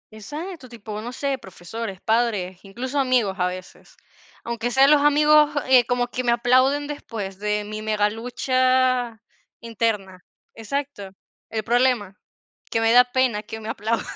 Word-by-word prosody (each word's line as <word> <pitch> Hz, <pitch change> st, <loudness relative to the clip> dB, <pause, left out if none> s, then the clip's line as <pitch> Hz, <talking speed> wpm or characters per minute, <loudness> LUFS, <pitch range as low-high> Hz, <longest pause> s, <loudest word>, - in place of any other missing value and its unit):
Exacto, 295 Hz, -, -8 dB
tipo, 215 Hz, -2 st, -7 dB
no 240 Hz, +2 st, -6 dB
sé, 270 Hz, +1 st, -2 dB
profesores, 190 Hz, +2 st, -7 dB
padres, 215 Hz, -6 st, 0 dB
incluso, 250 Hz, +8 st, -4 dB
amigos 250 Hz, -7 st, +2 dB
a 180 Hz, -, +2 dB
veces. 185 Hz, 0 st, -9 dB, 0.5 s
Aunque 235 Hz, 0 st, -3 dB
sea 265 Hz, +2 st, +5 dB
los 295 Hz, 0 st, +5 dB
amigos, 300 Hz, +1 st, +5 dB, 0.2 s
eh, 255 Hz, -2 st, +6 dB
como 245 Hz, 0 st, +1 dB
que 245 Hz, +1 st, -4 dB
me 240 Hz, -, +2 dB
aplauden 255 Hz, +4 st, +3 dB
después 215 Hz, -9 st, -6 dB
de 210 Hz, 0 st, -1 dB
mi 215 Hz, +1 st, -6 dB
mega 210 Hz, -1 st, +1 dB
lucha 255 Hz, 0 st, +1 dB, 0.4 s
interna. 210 Hz, -5 st, -3 dB, 0.3 s
Exacto, 230 Hz, -2 st, -5 dB, 0.4 s
¿el 220 Hz, -1 st, -3 dB
problema? 240 Hz, -4 st, +1 dB, 0.5 s
Que 225 Hz, -, 0 dB
me 225 Hz, 0 st, +3 dB
da 250 Hz, +1 st, +7 dB
pena 245 Hz, -4 st, 0 dB
que 220 Hz, +1 st, -8 dB
me 220 Hz, 0 st, -7 dB
aplaudan. 225 Hz, +1 st, -2 dB
235 Hz, 150 wpm, -23 LUFS, 210-255 Hz, 0.5 s, da